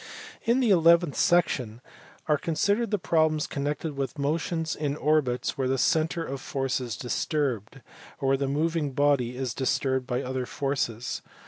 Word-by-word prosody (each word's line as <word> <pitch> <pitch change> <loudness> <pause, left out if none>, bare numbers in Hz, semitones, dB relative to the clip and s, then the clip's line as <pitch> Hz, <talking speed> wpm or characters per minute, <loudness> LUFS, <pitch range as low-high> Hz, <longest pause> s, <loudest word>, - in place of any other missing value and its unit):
In 240 +3 +3
the 235 -5 +3
eleventh 170 -3 +5
section 135 - +2 0.5
are 150 -2 +2
considered 200 +9 0
the 210 - +1
problems 155 -4 +1
connected 145 +2 -3
with 135 +1 -3
motion 160 +3 -1
in 145 -2 -1
orbits 140 -4 0
where 130 - +1
the 135 +1 +1
centre 160 +4 +1
of 135 0 -5
force 135 -2 -2
is 120 -5 -4
disturbed, 130 - -2 0.4
or 135 -2 0
where 135 - +3
the 140 0 -1
moving 150 0 0
body 130 -3 +2
is 130 -3 -2
disturbed 130 -1 0
by 125 -1 -1
other 130 -1 -3
forces. 130 -4 -2
140 Hz, 155 wpm, -27 LUFS, 130-160 Hz, 0.5 s, eleventh